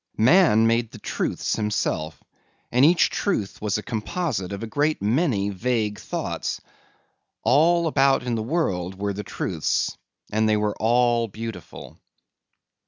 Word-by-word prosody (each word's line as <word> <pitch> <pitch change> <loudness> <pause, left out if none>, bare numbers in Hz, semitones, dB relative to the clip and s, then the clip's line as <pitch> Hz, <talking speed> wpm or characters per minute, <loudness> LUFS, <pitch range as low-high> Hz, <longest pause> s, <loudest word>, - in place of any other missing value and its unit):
Man 120 - +5
made 115 0 +2
the - - -11
truths - - -2
himself 100 -7 -2 0.5
and 125 +2 +3
each 165 +3 +5
truth 110 - -2
was 105 -1 0
a 105 - -6
composite 115 - -3
of 100 +2 -5
a - - -2
great 145 +7 0
many 110 - +1
vague 105 0 -1
thoughts. - - -4 0.8
All 170 +5 +4
about 135 -4 +3
in 125 -1 -2
the 115 - -1
world 95 - -1
were 100 0 -2
the 100 - -5
truths 85 -4 -2 0.4
and 110 +1 +2
they 105 - +3
were 105 0 -1
all 120 0 +2
beautiful. 115 +2 -9
115 Hz, 140 wpm, -24 LUFS, 105-135 Hz, 0.8 s, Man